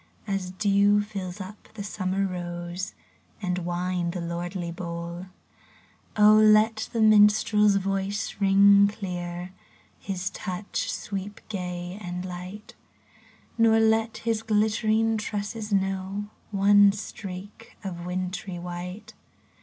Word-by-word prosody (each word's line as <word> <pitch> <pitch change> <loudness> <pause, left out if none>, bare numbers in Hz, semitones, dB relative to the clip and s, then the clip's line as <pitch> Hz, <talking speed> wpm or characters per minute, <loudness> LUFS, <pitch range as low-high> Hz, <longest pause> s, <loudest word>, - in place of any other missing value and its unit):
As 195 -2 -2
dew 200 +1 +3
fills 195 -3 -6
up 195 +2 -9
the 205 - -5
summer 195 -1 -1
rose 175 0 -5 0.4
And 180 -3 -1
wine 175 0 -2
the 180 +1 -4
lordly 170 +1 -4
bowl! 170 +1 -6 0.9
let 215 +1 +5
the 230 - -1
minstrePs 210 -1 +5
voice 195 +1 -2
ring 200 +1 +6
clear. 180 -3 -5 0.5
His 190 -1 -3
touch 185 +1 -4
sweep 200 0 -5
gay 180 -1 -5
and 180 -1 -5
light; 185 +3 -8 0.9
Nor 225 -1 +5
let 225 0 +2
his 225 -2 +1
glittering 220 +1 +2
tresses 210 +1 -4
know 195 +1 -1 0.2
One 205 0 +6
streak 200 +1 -8
of 175 -3 -5
wintry 180 +1 -4
white. 180 +5 -7
195 Hz, 105 wpm, -26 LUFS, 180-210 Hz, 0.9 s, ring